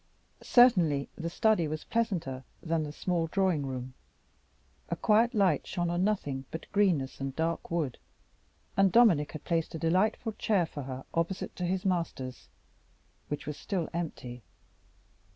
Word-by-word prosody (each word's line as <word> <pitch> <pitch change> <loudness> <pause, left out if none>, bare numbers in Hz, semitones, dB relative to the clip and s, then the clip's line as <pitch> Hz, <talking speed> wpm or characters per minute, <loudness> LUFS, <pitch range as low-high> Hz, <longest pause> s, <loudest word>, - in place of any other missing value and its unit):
Certainly 180 - +4
the 165 0 -4
study 210 -2 +2
was 155 +1 -4
pleasanter 175 - -1 0.2
than 165 -1 0
the 150 -1 -4
small 170 +1 -1
drawing 175 -5 +1
room. 130 -1 -5 1.0
A - - 0
quiet 230 +3 +3
light 190 -8 +2
shone 175 -2 -1
on 175 +1 +1
nothing 145 -10 -1
but 160 - -6
greenness 175 -11 +1
and 135 0 -3
dark 165 +1 -1
wood, 160 -7 -2 0.8
and 195 -1 +4
Dominic 185 -10 +5
had 155 - -7
placed 165 -1 -1
a - - -2
delightful 185 +8 +1
chair 195 -6 +2
for 150 -2 -7
her 130 0 -6
opposite 170 +3 -2
to 180 - -2
his 185 +2 -1
master's, 165 -9 -2 0.8
which 145 - -4
was 150 -1 -5
still 180 -5 -2
empty. 130 -8 -5
165 Hz, 150 wpm, -30 LUFS, 145-190 Hz, 1.0 s, Dominic